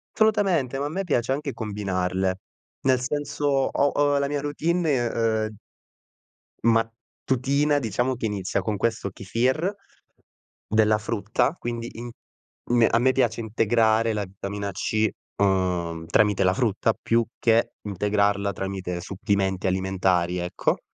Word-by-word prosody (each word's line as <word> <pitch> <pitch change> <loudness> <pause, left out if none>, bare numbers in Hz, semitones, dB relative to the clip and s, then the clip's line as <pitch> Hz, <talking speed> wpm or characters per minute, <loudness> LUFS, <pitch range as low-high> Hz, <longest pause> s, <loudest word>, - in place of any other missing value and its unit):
Assolutamente, 190 - +2
ma 140 - -1
a - - -2
me 190 +6 -3
piace 130 -7 0
anche 140 +1 -2
combinarle. 95 -4 -2 0.4
Nel 130 -1 +3
senso, 145 +2 -2 0.3
ho 145 - +3
ho 145 0 +2
la 140 0 0
mia 145 0 -1
routine 160 +4 0
e - - +3 0.5
ehm 110 -1 -9 1.1
mattutina, 125 +5 +1
diciamo, 125 +1 0
che 115 - -2
inizia 100 -3 -2
con 105 -2 -1
questo 110 -1 -1
Kèfir, 130 - 0 0.9
della 110 0 +3
frutta, 110 +4 0
quindi 120 0 -4
in 120 +1 -7 0.6
me 120 -1 +5
a 115 - +3
me 130 +2 +4
piace 120 -3 +1
integrare 110 0 +2
la 105 -1 -1
vitamina 100 +1 -5
C, 110 +3 0 0.3
ehm, 90 -4 0
tramite 105 +1 +3
la 95 0 +3
frutta, 115 -1 +1
più 115 0 +2 0.2
che 115 0 +3
integrarla 100 0 0
tramite 95 -2 -4
supplementi 95 0 -1
alimentari, 95 -1 +1
ecco 90 0 -1
110 Hz, 130 wpm, -25 LUFS, 100-130 Hz, 1.1 s, me